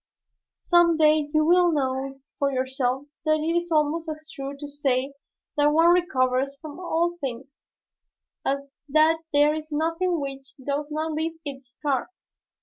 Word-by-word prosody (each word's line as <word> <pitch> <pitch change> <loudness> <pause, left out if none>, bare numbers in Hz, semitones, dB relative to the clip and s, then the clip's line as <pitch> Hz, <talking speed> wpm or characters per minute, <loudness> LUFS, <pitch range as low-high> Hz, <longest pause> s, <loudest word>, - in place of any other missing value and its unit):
Some 345 -2 +3
day 305 -1 +4
you 310 0 +3
will 350 +1 +5
know 270 -2 -2 0.2
for 280 -1 +2
yourself 260 0 -1 0.2
that 310 0 +3
it 325 +2 0
is 345 0 -1
almost 315 +1 +1
as 310 0 -7
true 275 -1 -6
to 290 +1 -7
say 275 -2 -1 0.4
that 290 0 +4
one 330 +3 +5
recovers 275 -6 +1
from 310 0 -9
all 345 -1 0
things 270 +1 -6 0.8
as 280 0 -2 0.2
that 310 +3 +4
there 290 +1 +4
is 310 0 -6
nothing 330 +3 0
which 270 -1 -6
does 285 +2 -3
not 310 +1 -2
leave 320 +1 -2
its 270 -3 -8
scar. 275 -2 -1
295 Hz, 150 wpm, -25 LUFS, 275-320 Hz, 0.8 s, will